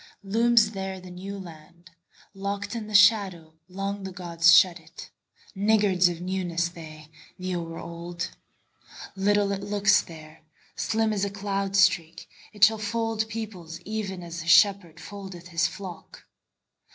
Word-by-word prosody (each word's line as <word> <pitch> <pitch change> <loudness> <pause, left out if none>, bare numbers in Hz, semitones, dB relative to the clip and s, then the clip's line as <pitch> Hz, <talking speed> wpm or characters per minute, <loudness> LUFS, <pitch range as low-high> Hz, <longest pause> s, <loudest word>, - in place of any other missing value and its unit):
Looms 225 +2 +3
there 190 -2 -5
the 185 0 -12
New 195 +3 -7
Land:Locked 185 +4 -9
in 220 -2 -5
the 215 - -4
shadowLong 195 -1 +2
the 190 - -6
gods 170 -2 +2
shut 175 -2 +4
it, 165 - -13 0.4
Niggards 200 -3 +3
of 175 - -5
newnessThey, 170 -4 -4 0.3
the 185 0 -3
o'er 165 -1 -5
old. 170 +1 -6 0.8
Little 200 +1 +2
it 200 0 -3
looks 205 0 +3
there, 155 -1 -13 0.3
Slim 220 0 0
as 200 -2 -1
a 200 - 0
cloud 195 -1 -3
streak; 170 -4 +2 0.2
It 210 -2 -2
shall 220 +1 +6
fold 220 +1 -2
peoplesEven 195 -2 -6
as 170 0 -7
a 165 - -9
shepherdFoldeth 190 -1 +1
his 165 -1 +1
flock. 185 -2 -10
190 Hz, 125 wpm, -26 LUFS, 170-205 Hz, 0.8 s, shall